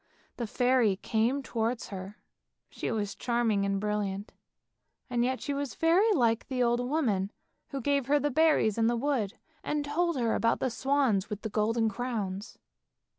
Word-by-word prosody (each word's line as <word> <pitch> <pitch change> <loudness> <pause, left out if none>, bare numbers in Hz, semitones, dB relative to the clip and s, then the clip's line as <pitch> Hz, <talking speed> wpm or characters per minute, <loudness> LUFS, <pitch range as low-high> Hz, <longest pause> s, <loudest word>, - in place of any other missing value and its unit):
The 235 - -3
fairy 245 -3 +3
came 230 +8 0
towards 230 -1 -2
her, 195 +1 -7 0.5
she - - -4
was 210 -3 -2
charming 230 -5 0
and 195 0 0
brilliant, 205 -1 -2 0.8
and 240 -1 +2
yet 255 +1 -1
she 285 - -2
was 280 -2 -3
very 350 +7 +4
like 235 - +2
the 255 -2 0
old 240 0 +2
woman 245 -8 0 0.4
who 275 -2 -5
gave 280 0 +1
her 290 +1 +4
the 290 +1 0
berries 295 -7 +3
in 225 - +3
the 240 0 +1
wood, 240 -6 -1 0.3
and 295 -1 -1
told 330 +1 0
her 230 -2 +1
about 230 0 +2
the 260 - 0
swans 260 -6 +1
with 210 -1 -5
the 220 - -2
golden 225 +2 +1
crowns. 210 -3 -4
235 Hz, 170 wpm, -29 LUFS, 210-275 Hz, 0.8 s, very